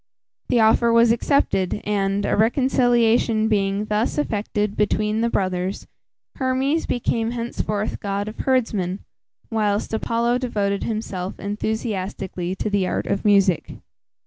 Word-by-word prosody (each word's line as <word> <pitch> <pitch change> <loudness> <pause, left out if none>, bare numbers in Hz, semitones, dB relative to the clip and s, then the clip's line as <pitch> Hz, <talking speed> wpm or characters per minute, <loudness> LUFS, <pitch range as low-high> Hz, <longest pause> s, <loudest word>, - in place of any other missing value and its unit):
The 245 - +3
offer 225 +1 +4
was 230 0 +5
accepted, 230 -6 +1
and, 200 -1 0
a - - +1
reconciliation 235 -1 +3
being 200 -1 0
thus 215 +5 -1
effected 210 -6 -1
between 210 +1 +1
the 235 - +1
brothers, 185 -2 -2 0.5
Hermes 265 +4 0
became 230 -2 0
henceforth 230 -3 -3
god 200 0 -3
of 215 - -8
herdsmen, 210 -8 0 0.5
whilst 210 -1 0
Apollo 235 +2 0
devoted 205 -5 -1
himself 200 -4 -4
enthusiastically 200 -4 -3
to 190 - -3
the 200 -2 +1
art - - -2
of 200 - -1
music. 200 -4 +3
215 Hz, 120 wpm, -22 LUFS, 200-235 Hz, 0.5 s, was